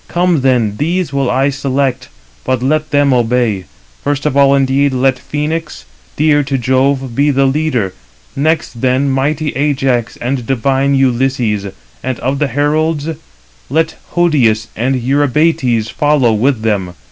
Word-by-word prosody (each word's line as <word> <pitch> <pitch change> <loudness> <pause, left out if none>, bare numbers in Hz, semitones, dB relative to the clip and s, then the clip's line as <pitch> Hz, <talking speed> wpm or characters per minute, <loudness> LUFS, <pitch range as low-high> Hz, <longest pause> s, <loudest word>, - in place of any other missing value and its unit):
Come 175 -3 +1
then, 120 -6 +1
these 170 +2 -1
will 135 -2 0
I 135 +3 +1
select, 135 -1 -2 0.3
but 130 -1 -1
let 155 +3 0
them 145 -2 +3
obey. 120 -5 0 0.4
First 145 0 -1
of 150 - 0
all 140 0 +5
indeed 135 +1 +2
let 130 0 +2
Phœnix, 155 +4 -4 0.3
dear 150 -1 +3
to 135 -1 -2
Jove, 130 0 0
be 145 +3 +2
the 135 -1 +2
leader; 135 -8 0 0.4
next 155 -4 -1
then 130 +2 +1
mighty 145 +3 0
Ajax 135 -4 -1
and 125 -1 -3
divine 135 +2 +1
Ulysses: 125 -5 0 0.3
and 130 -2 -3
of 135 +2 -1
the 150 - +1
heralds, 150 +3 0 0.6
let 160 +4 0 0.2
Hodius 120 -11 +2
and 130 +4 0
Eurybates 130 -3 +1
follow 145 -6 +2
with 120 +2 +1
them. 100 -5 -1
135 Hz, 140 wpm, -14 LUFS, 125-145 Hz, 0.6 s, all